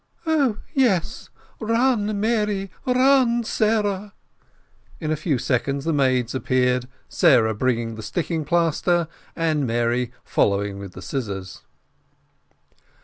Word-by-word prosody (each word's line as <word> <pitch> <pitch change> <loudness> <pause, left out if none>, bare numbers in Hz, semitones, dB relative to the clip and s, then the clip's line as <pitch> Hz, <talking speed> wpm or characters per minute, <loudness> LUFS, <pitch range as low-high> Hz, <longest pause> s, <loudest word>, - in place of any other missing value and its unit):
"Oh, 285 -9 +2 0.2
yes 235 - +1 0.3
run, 225 -2 +1
Mary 210 -3 0 0.2
run, 255 -2 +4
Sarah!" 210 -3 0 0.8
In 155 -2 -2
a - - +2
few 150 -2 -1
seconds 135 +3 -1
the 165 - +1
maids 130 -4 +1
appeared, 125 -1 +1 0.2
Sarah 110 -1 +4
bringing 115 0 -1
the 110 - -8
sticking 160 - -2
plaster, 170 +2 +1 0.3
and 155 -5 0
Mary 120 +1 0
following 100 0 0
with 100 -2 -9
the 90 - -10
scissors. 95 -4 -5
155 Hz, 110 wpm, -23 LUFS, -, 0.8 s, run